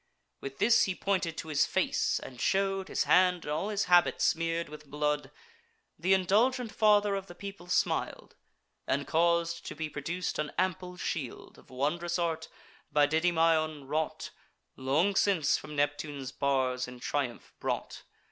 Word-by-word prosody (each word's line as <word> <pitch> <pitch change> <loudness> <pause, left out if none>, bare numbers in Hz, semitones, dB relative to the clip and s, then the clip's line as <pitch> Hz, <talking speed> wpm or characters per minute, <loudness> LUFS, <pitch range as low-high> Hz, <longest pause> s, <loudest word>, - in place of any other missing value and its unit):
With 135 0 -7
this 225 +4 +5
he 190 - -2
pointed 185 -5 -1
to 160 - -6
his 145 -2 +2
face, - - +1
and 125 -3 -10
show'd 195 0 +1
His - - 0
hand 180 -1 +4
and 150 - -4
all 160 +7 -1
his 205 -1 0
habit 175 -2 +4
smear'd 165 0 +1
with 150 -1 -12
blood. 150 0 -1 0.7
Th' - - -11
indulgent 215 +6 +3
father 210 -2 +4
of 195 -1 -3
the 175 - -11
people 195 -2 -9
smil'd, 180 - -1 0.5
And 140 +1 0
caus'd 170 0 +1
to - - -6
be 155 0 -4
produc'd 175 +5 -3
an 150 -1 -2
ample 185 -1 -1
shield, 145 -8 -5
Of - - -21
wondrous 170 +7 -1
art, 165 -2 -2 0.4
by 150 -1 +5
Didymaon 160 -2 +1
wrought, 155 +2 -2 0.4
Long 155 +10 +1
since 190 -7 +3
from 150 0 -9
Neptune's 145 -2 -2
bars 130 -2 0
in 125 0 -10
triumph 130 -3 -3
brought. - - -3
165 Hz, 155 wpm, -30 LUFS, 145-185 Hz, 0.7 s, this